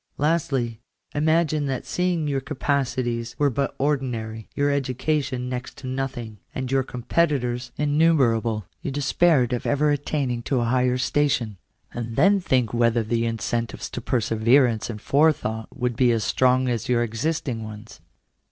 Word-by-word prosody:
Lastly, 140 -7 0 0.3
imagine 155 0 +2
that 130 -2 -3
seeing 180 -3 0
your 140 -2 0
capacities 130 -5 -1
were 145 -1 +2
but 140 +3 -1
ordinary, 120 -6 -2
your 145 0 +2
education 135 -1 -1
next 125 -1 -5
to - - -10
nothing, 130 -5 -4 0.2
and 130 -1 -3
your 135 0 +3
competitors 125 -2 -1
innu 155 +3 +3
merable, 115 -4 +1 0.2
you 165 - -3
despaired 140 -1 +2
of 120 - -2
ever 145 +1 +2
attaining 140 -4 -1
to 130 +2 0
a 120 - +1
higher 125 +1 +2
station; 130 -5 0 0.4
and 115 -1 -5
then 195 - +5
think 125 - +1
whether 115 -1 +2
the 115 +1 0
incentives 115 0 -3
to 120 - -5
perseverance 115 +1 +2
and 105 -3 -6
forethought 135 -7 +1
would 125 -1 -2
be 125 +1 +4
as 115 -2 +1
strong 130 0 +2
as 120 -2 -2
your 120 -1 +3
existing 120 0 -2
ones. 110 +1 -10
130 Hz, 150 wpm, -24 LUFS, 115-145 Hz, 0.4 s, then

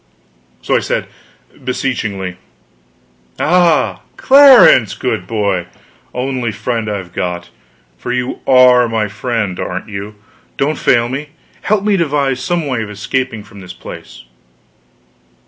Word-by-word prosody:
So - - +1
I - - +4
said - - -2 0.6
beseechingly: 105 -8 -3 1.0
"Ah, 175 -1 +2 0.2
Clarence, 260 - +7
good 110 -8 -3
boy, 100 -5 -1 0.4
only 125 -2 -2
friend 115 +1 -3
I've 95 -4 -5
got, 90 -1 -4 0.5
for 125 - -4
you 125 0 -2
are 125 -2 +6
my 110 -2 0
friend, 105 -2 -3
aren't 90 +4 -4
you? 100 +1 -7 0.4
don't 150 +3 -1
fail 120 -2 +3
me; 140 +4 -5 0.3
help 210 -1 0
me 205 -1 +2
to 170 - +2
devise 140 -3 0
some 170 +4 -1
way 130 -5 -2
of 110 - -5
escaping 110 +3 -3
from 100 - -14
this 90 -1 -10
place!" 90 - -11
120 Hz, 130 wpm, -15 LUFS, 100-135 Hz, 1.0 s, Clarence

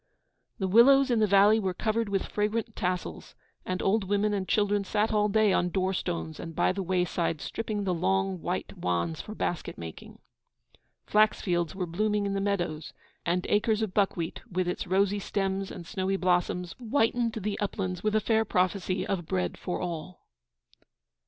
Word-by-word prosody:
The 190 - -1
willows 260 +6 +6
in 235 - +3
the 215 - +4
valley 200 +2 +6
were 190 -3 -2
covered 220 +1 0
with 195 -1 0
fragrant 220 +2 -2
tassels, 180 0 -3 0.3
and 185 0 -1
the - - -4
old 205 +2 +2
women 205 +2 +1
and 195 -2 -2
children 205 -1 +2
sat 215 +2 0
all 210 0 +3
day 215 -1 +3
on 180 - +2
door 190 +1 0
stones 80 - -3
and 165 -1 -7
by - - +3
the 195 +1 -3
wayside 180 -3 0
stripping 215 +2 -3
the 185 -2 0
long, 95 - 0
white 85 - -3
wands 85 -2 -1
for 215 - -9
basket 175 - -3
making. 80 -1 -9 0.9
Flax 215 +1 +3
fields 175 -2 -1
were 185 -2 -2
blooming 210 +4 0
in 200 - -1
the 195 - -1
meadows, 175 -6 -2 0.3
and 180 +1 +1
acres 215 +1 +2
of 205 -4 -3
buckwheat, 185 -5 0
with 185 0 0
its 180 - -3
rosy 200 +2 +2
stems 195 -1 -2
and 175 - -8
snowy 195 0 -1
blossoms, 180 -1 0
whitened 235 -1 +1
the 210 -1 -3
uplands 185 -3 -2
with 215 +1 0
a - - +5
fair 220 +1 +2
prophecy 185 -1 0
of 175 -5 -2
bread 90 -1 -1
for 180 - -4
all. 175 0 -6
195 Hz, 180 wpm, -28 LUFS, 180-210 Hz, 0.9 s, willows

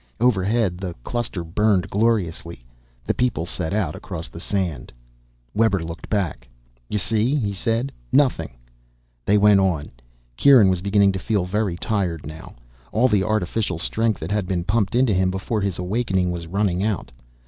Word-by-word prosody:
Overhead 105 -4 +2
the 90 -3 -5
cluster 115 - -3
burned 95 +2 +1
gloriously. 90 - -1 0.4
The - - +1
people 125 -9 0
set 85 -2 -4
out 100 -7 0
across 85 -3 -7
the 85 - -10
sand. 90 -4 -3 0.6
Webber 105 -5 +2
looked 85 +1 -8
back. 90 - -2 0.4
"You 105 - -1
see?" 110 +6 +1
he 105 -8 -1
said. 115 +7 -1 0.2
"Nothing." 85 - +2 0.7
They 105 - +4
went 105 -1 +6
on. 90 -6 0 0.5
Kieran 125 -9 +7
was 90 -2 -1
beginning 100 0 +3
to 95 - -3
feel 100 -1 0
very 100 -1 -1
tired 90 -6 -2
now, 80 +2 -10 0.4
all 120 +5 +3
the 105 -3 +3
artificial 105 -2 -1
strength 110 +5 0
that 80 +4 -4
had 105 -3 0
been 90 -2 -1
pumped 105 +3 0
into 125 -3 +3
him 95 0 +2
before 95 +4 -2
his 100 -3 -1
awakening 95 -1 0
was 85 -1 -5
running 95 0 0
out. 105 -3 -2
100 Hz, 160 wpm, -22 LUFS, 90-110 Hz, 0.7 s, Kieran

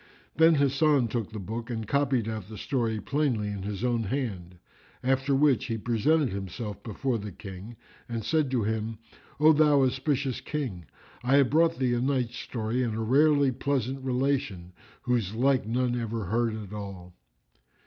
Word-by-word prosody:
Then 160 0 +6
Hasan 140 -2 +3
took 115 -2 -3
the 110 - -6
book 115 +4 -5
and 110 -3 -4
copied 140 -4 +1
out 110 -3 -5
the 110 - -8
story 115 -4 -1
plainly 125 -4 0
in 100 -1 -4
his 100 +2 -4
own 120 -2 +1
hand; 95 -8 -3 0.5
after 135 +2 +2
which 135 -5 +3
he 115 -2 -2
presented 125 +7 +2
himself 100 +2 -5
before 120 +2 -2
the 105 0 -6
King 95 +4 -9 0.3
and 115 -2 -3
said 150 +3 +1
to 125 -4 0
him, 110 +1 -2 0.4
"O 155 +1 +7
thou 150 -2 +5
auspicious 130 0 0
King, 125 - -4 0.4
I 130 +3 +3
have 140 -3 +4
brought 165 +2 +3
thee 125 -2 +1
a 120 - 0
night 130 -3 0
story 120 0 -3
and 115 -3 -1
a - - -3
rarely 140 +3 +4
pleasant 135 0 -2
relation, 125 -9 -1 0.3
whose 115 -5 0
like 130 -1 +2
none 125 +1 0
ever 115 -3 -3
heard 115 +3 0
at 105 -2 -8
all." 95 -4 -7
120 Hz, 170 wpm, -28 LUFS, 110-135 Hz, 0.5 s, O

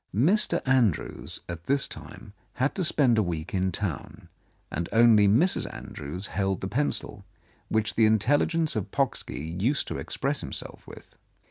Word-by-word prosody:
Mr. 170 - +3
Andrews 125 - 0
at 85 -1 -7
this 140 +1 +1
time - - -11 0.2
had 130 +3 0
to 190 - -2
spend 130 -8 +3
a - - +4
week 85 -3 -4
in 95 -1 +1
town, 90 -5 -5 0.4
and 85 +2 -3
only 110 -3 +6
Mrs. 140 - +2
Andrews 75 +7 -6
held 95 -1 -1
the 95 - -3
pencil 115 -3 -2 0.5
which 110 0 0
the 110 -1 +4
intelligence 145 +9 +2
of 105 -4 -2
Pocksky 80 +4 -2
used 130 +6 +1
to - - -4
express - - -2
himself - - -5
with. - - -14
110 Hz, 150 wpm, -27 LUFS, 95-135 Hz, 0.5 s, only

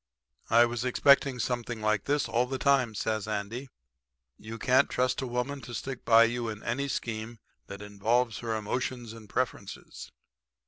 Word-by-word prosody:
"'I 115 +1 +6
was 120 0 -3
expecting 135 +1 +4
something 120 -1 -2
like 110 -1 0
this 145 -2 +1
all 120 +2 +1
the 135 +1 -3
time,' 130 -5 +2
says 110 -1 -2
Andy. 110 +5 -4 0.7
'You 110 +8 -8
can't 130 +4 +3
trust 125 +2 0
a 130 - -3
woman 125 +3 -3
to 120 -2 -8
stick 130 +3 -5
by 115 0 +7
you 120 0 -1
in 105 -1 -7
any 140 +4 -1
scheme 115 -2 -4 0.3
that 100 +1 -8
involves 110 +3 0
her 115 -2 -2
emotions 120 +2 -3
and 110 -3 -13
preferences.' 125 0 -4
120 Hz, 165 wpm, -29 LUFS, 110-125 Hz, 0.7 s, by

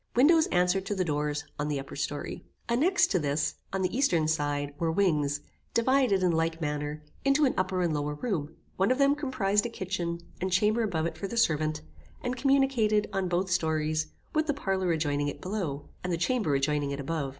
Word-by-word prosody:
Windows 315 +6 +5
answered 180 +2 +2
to 205 - -1
the 185 -1 0
doors 150 -1 -1 0.2
on 145 - -1
the 145 -2 -1
upper 135 - -8
story. 145 0 -4 0.2
Annexed 285 +11 +3
to 185 - +3
this, 145 0 -1
on 190 0 -1
the 185 +4 -1
eastern 175 - +2
side, 145 -2 -1
were 165 -1 +1
wings, 150 -6 +1 0.3
divided, 235 -5 +3
in 180 - +4
like 165 0 0
manner, 150 -1 -3 0.2
into 275 +2 +4
an 260 - +2
upper 185 -1 0
and 170 -3 +1
lower 150 0 -2
room; 160 -5 -3 0.2
one 190 +3 +3
of 255 - +3
them 280 0 +4
comprized 240 -8 0
a - - -7
kitchen, 180 -5 -3 0.2
and 185 +1 -1
chamber 210 +5 +3
above 170 -8 0
it 170 - -4
for 200 - -3
the 235 - -5
servant, 155 -6 +1 0.4
and 245 0 -1
communicated, 250 -6 +2
on 195 -2 0
both 180 +1 0
stories, 155 -3 +1 0.3
with 310 0 +1
the 295 - +1
parlour 190 -8 0
adjoining 145 -3 0
it 145 - -4
below, 175 -8 -3 0.2
and 180 - -2
the 170 - +1
chamber 180 - +1
adjoining 145 +1 +1
it 140 0 -4
above. 140 0 -2
180 Hz, 200 wpm, -28 LUFS, 150-215 Hz, 0.4 s, Windows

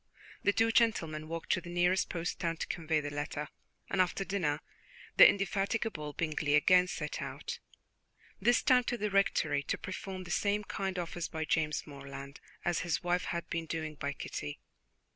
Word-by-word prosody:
The 205 - +4
two 225 +2 +3
gentlemen 165 -10 +2
walked 165 0 -4
to 185 - +2
the 175 - -9
nearest 175 +2 +2
post 170 0 -3
town 165 -1 -1
to - - -2
convey 160 -2 0
the 145 0 -4
letter; 145 +1 -3 0.4
and 190 - +2
after 185 +2 0
dinner 155 -7 0 0.6
the - - +11
indefatigable 195 -5 -1
Bingley 155 -2 +1
again 180 +4 +6
set - - -4
out, - - -5 0.8
this 240 0 +4
time 250 -1 +5
to 245 - -1
the 210 -2 -1
Rectory, 160 -7 +2
to - - -2
perform 190 0 -6
the 175 - -8
same 205 +2 +1
kind 195 -2 -3
office 175 -1 -3
by 160 0 -3
James 155 -1 0
Morland 140 -1 -9 0.3
as 175 -1 +2
his 170 +1 -1
wife 175 +1 +1
had 170 -1 -3
been 165 -1 -2
doing 155 -1 -3
by 145 -1 -3
Kitty. 75 - -5
170 Hz, 175 wpm, -32 LUFS, 155-195 Hz, 0.8 s, the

